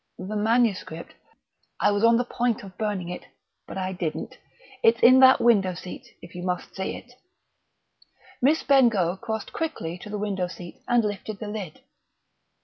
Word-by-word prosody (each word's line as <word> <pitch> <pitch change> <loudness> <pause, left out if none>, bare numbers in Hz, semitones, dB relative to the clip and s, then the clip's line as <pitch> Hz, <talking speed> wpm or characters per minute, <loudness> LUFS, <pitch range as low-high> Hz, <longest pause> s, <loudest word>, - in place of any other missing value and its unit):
The 195 +4 -6
manuscript? 215 -6 0 0.7
I - - +3
was 205 +1 0
on 230 0 +6
the 245 - 0
point 240 -1 -1
of 190 -2 -11
burning 205 -5 -3
it, 180 - -7 0.4
but - - -7
I 190 0 -2
didn't. 170 -4 -5 0.4
It's 225 0 +4
in 255 +2 +8
that 260 0 +7
window 195 -6 +3
seat, 180 0 -10
if 170 - -12
you 175 - -7
must 180 0 -4
see 190 - -3
it." 245 - -14 1.3
Miss 290 +5 +3
Bengough 225 -10 +3
crossed 220 -2 -4
quickly 180 - -4
to 210 - -10
the 210 - -4
window 200 -3 -2
seat, 175 -1 -11
and 240 -1 +3
lifted 205 0 -4
the 210 0 -6
lid. 200 -7 -6
210 Hz, 165 wpm, -25 LUFS, 185-235 Hz, 1.3 s, in